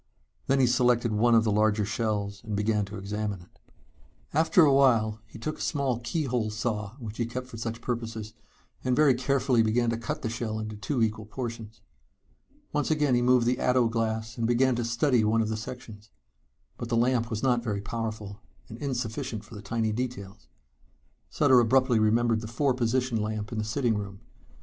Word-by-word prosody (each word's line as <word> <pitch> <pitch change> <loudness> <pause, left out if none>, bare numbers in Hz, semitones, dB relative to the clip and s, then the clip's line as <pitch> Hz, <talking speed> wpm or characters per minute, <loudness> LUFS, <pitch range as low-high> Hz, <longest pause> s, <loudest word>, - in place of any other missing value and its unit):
Then 135 0 +3
he 130 - +5
selected 120 -1 +2
one 115 +3 +4
of 110 - +5
the 110 - +1
larger 105 0 +2
shells 105 -1 -2
and 110 -2 -4
began 105 0 +1
to 100 +1 -8
examine 105 0 -3
it. 90 - -21 0.7
After 160 +3 +5
a 140 - +4
while 115 -6 +3
he 110 - -12
took 155 +8 -5
a - - -7
small 135 -5 -1
keyhole 125 -4 -1
saw 105 -1 -3
which 110 -5 -8
he 120 - 0
kept 125 +2 -5
for 125 -2 -10
such 115 +1 -4
purposes, 115 -3 -4 0.5
and 130 -1 +1
very 150 -2 +5
carefully 130 -1 +2
began 115 +2 +2
to 115 - -1
cut 115 - -5
the - - 0
shell 115 -1 -3
into 110 0 -5
two 115 +4 -1
equal 110 -1 -2
portions. 115 -2 -6 0.9
Once 150 0 0
again 150 -4 +2
he 120 - +3
moved 125 -1 +4
the 125 +1 +1
ato 125 -1 +3
glass 115 0 -2
and 115 - +1
began 125 +2 +3
to 120 - -1
study 115 +1 +2
one 110 +1 +2
of 110 - -3
the 110 - -1
sections. 110 -2 -9 0.7
But 120 - -5
the 115 - +1
lamp 120 -1 +2
was 110 -2 -4
not 125 -3 +2
very 105 -4 -2
powerful, 110 -2 -5 0.3
and 115 - -9
insufficient 125 -3 -3
for - - -15
the 105 - -8
tiny 110 +1 -1
details. 105 - -5 0.8
Sutter 130 -4 +4
abruptly 125 0 +3
remembered 115 +1 +2
the 110 - -6
four 130 +4 +1
position 125 -1 0
lamp 105 -1 -3
in 115 - -3
the - - -1
sitting 115 +1 0
room. 100 -2 -6
115 Hz, 190 wpm, -27 LUFS, 110-125 Hz, 0.9 s, he